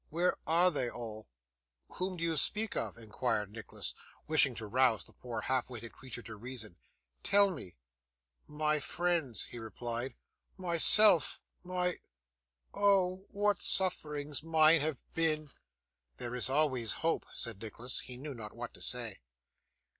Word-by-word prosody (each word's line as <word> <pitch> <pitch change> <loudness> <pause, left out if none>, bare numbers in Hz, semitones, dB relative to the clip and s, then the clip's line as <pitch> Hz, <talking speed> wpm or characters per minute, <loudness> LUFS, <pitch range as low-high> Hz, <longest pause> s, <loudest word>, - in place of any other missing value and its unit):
Where 175 +3 +1
are 175 +3 +5
they 130 -6 -1
all!' 110 -3 -8 0.7
'Whom 185 0 -3
do 165 - -4
you 165 -1 0
speak 210 +9 +1
of?' - - -3
inquired 110 -2 -2
Nicholas, 115 0 -2 0.3
wishing 145 -5 +4
to 110 - -6
rouse 120 +1 +2
the - - -13
poor 120 -3 -6
half 130 -1 -1
witted 115 -2 -8
creature 125 -2 -9
to 110 - -8
reason. 115 -4 -7 0.5
'Tell 200 0 +5
me.' 95 - -8 0.7
'My 150 0 0
friends,' 165 - -1
he 120 - -7
replied, 120 +2 -4 0.4
'myself 180 0 +6 0.2
my 180 0 -1 0.7
oh! 190 -2 +2
what 205 0 0
sufferings 150 -6 +1
mine 160 0 +5
have 155 -3 -2
been!' 155 -3 0 0.7
'There 120 0 -5
is 125 +1 0
always 130 -6 +1
hope,' 165 - 0
said 115 -4 -3
Nicholas; 115 +3 -3
he 125 - -5
knew 145 +2 -7
not 110 -4 -9
what 120 0 -7
to - - -11
say. 120 -5 0
140 Hz, 140 wpm, -32 LUFS, 120-170 Hz, 0.7 s, myself